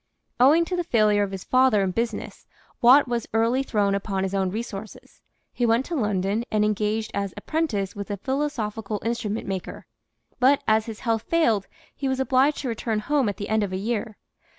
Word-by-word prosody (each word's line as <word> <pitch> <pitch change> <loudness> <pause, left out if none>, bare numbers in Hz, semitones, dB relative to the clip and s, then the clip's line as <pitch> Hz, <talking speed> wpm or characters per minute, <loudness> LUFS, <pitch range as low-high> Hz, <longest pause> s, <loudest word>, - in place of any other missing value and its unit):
Owing 300 +7 +5
to 360 - -3
the 350 - -1
failure 215 -9 +3
of 200 - 0
his 195 -1 -6
father 255 -6 +3
in 190 - 0
business, 230 +2 -4 0.3
Watt 260 +4 +7
was 240 -2 -2
early 230 +4 +2
thrown 205 -6 0
upon 195 -1 -2
his 195 0 -2
own 190 -1 +1
resources. 215 0 -7 0.3
He 245 - -2
went 235 +2 +3
to 345 - -4
London 205 -3 0
and 210 -1 +2
engaged 215 +1 -1
as 200 -2 -3
apprentice 225 - -2
with 200 0 -6
a 205 - -3
philosophical 225 -5 -3
instrument 230 -2 -2
maker, 190 -2 -5 0.5
but 270 +3 +4
as 220 +1 +3
his 220 -2 -7
health 225 -3 0
failed 230 - +2 0.3
he 275 - -2
was 265 0 -1
obliged 265 +2 +3
to 275 - -4
return 225 -1 -2
home 265 +2 +1
at 200 - -5
the 205 - -5
end 220 0 +2
of 200 -2 -2
a 185 - -2
year. 220 +1 -3
220 Hz, 195 wpm, -24 LUFS, 205-255 Hz, 0.5 s, Watt